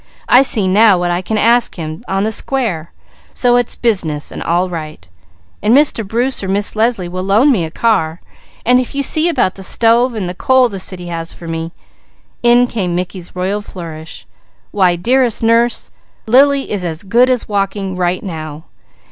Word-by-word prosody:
I 250 Hz, -, +6 dB
see 225 Hz, -7 st, 0 dB
now 205 Hz, +1 st, +5 dB
what 175 Hz, 0 st, -1 dB
I 175 Hz, +1 st, -1 dB
can 215 Hz, +4 st, -3 dB
ask 235 Hz, +3 st, +2 dB
Him 160 Hz, -1 st, -6 dB
on 195 Hz, +1 st, -1 dB
the 220 Hz, -, -1 dB
square; 220 Hz, -10 st, -2 dB, 0.4 s
so 245 Hz, -1 st, +3 dB
it's 245 Hz, -1 st, 0 dB
business 170 Hz, -11 st, -1 dB
and -, -, -7 dB
all 175 Hz, +2 st, 0 dB
right; 155 Hz, -, -8 dB, 0.5 s
and 220 Hz, +5 st, +4 dB
Mr. 285 Hz, -6 st, +2 dB
Bruce 240 Hz, +6 st, -1 dB
or -, -, -3 dB
Miss 200 Hz, +3 st, -1 dB
Leslie 220 Hz, -4 st, 0 dB
will 180 Hz, +1 st, -5 dB
loan 210 Hz, +9 st, +3 dB
me 190 Hz, -10 st, +1 dB
a -, -, -6 dB
car, 170 Hz, -4 st, 0 dB, 0.5 s
and 250 Hz, +1 st, +4 dB
if 255 Hz, +2 st, -4 dB
you 280 Hz, -, 0 dB
see 315 Hz, +4 st, +2 dB
about 190 Hz, -, +1 dB
the 195 Hz, -, -11 dB
stove 230 Hz, +5 st, +2 dB
and 200 Hz, -5 st, -3 dB
the 180 Hz, -, -4 dB
coal 260 Hz, +5 st, +3 dB
the 195 Hz, -3 st, -6 dB
city 180 Hz, -1 st, -4 dB
has 165 Hz, -1 st, -4 dB
for 170 Hz, -, -11 dB
me" 165 Hz, 0 st, -4 dB, 0.7 s
in 240 Hz, +1 st, +5 dB
came 190 Hz, -8 st, -2 dB
Mickey's 180 Hz, 0 st, -5 dB
royal 190 Hz, +3 st, -2 dB
flourish 165 Hz, -5 st, -9 dB, 0.5 s
"why 185 Hz, -3 st, +2 dB
dearest 240 Hz, +5 st, +1 dB
Nurse 230 Hz, +1 st, +1 dB, 0.3 s
Lady, 245 Hz, +4 st, +6 dB
Lily 280 Hz, -1 st, -2 dB
is 200 Hz, -3 st, -2 dB
as 165 Hz, 0 st, -4 dB
good 235 Hz, +6 st, +3 dB
as 255 Hz, -2 st, 0 dB
walking 195 Hz, -2 st, -2 dB
right 180 Hz, 0 st, -1 dB
now! 155 Hz, -4 st, -7 dB
200 Hz, 190 wpm, -15 LUFS, 175-240 Hz, 0.7 s, I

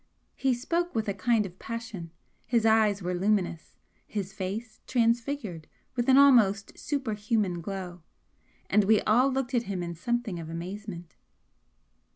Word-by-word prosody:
He 265 Hz, -2 st, +1 dB
spoke 340 Hz, +7 st, -1 dB
with 220 Hz, -1 st, 0 dB
a 200 Hz, -, 0 dB
kind 215 Hz, +2 st, +2 dB
of 185 Hz, -1 st, -10 dB
passion 225 Hz, -7 st, -6 dB, 0.4 s
his 235 Hz, -3 st, +2 dB
eyes 215 Hz, -3 st, +4 dB
were 180 Hz, +1 st, -1 dB
luminous 185 Hz, -3 st, -1 dB, 0.3 s
his 195 Hz, -2 st, -4 dB
face 215 Hz, +3 st, -5 dB
transfigured 230 Hz, -, 0 dB, 0.3 s
with 240 Hz, +1 st, 0 dB
an 260 Hz, -, +7 dB
almost 225 Hz, -8 st, +5 dB
superhuman 215 Hz, -, -1 dB
glow, 180 Hz, -1 st, -6 dB, 0.7 s
and 210 Hz, -1 st, +3 dB
we 215 Hz, +1 st, +4 dB
all 250 Hz, +5 st, +3 dB
looked 265 Hz, -1 st, -2 dB
at 240 Hz, -, +3 dB
him 185 Hz, -3 st, -2 dB
in 170 Hz, 0 st, -4 dB
something 220 Hz, +1 st, -2 dB
of 160 Hz, -1 st, -7 dB
amazement. 175 Hz, +1 st, -7 dB
215 Hz, 145 wpm, -28 LUFS, 185-240 Hz, 0.7 s, an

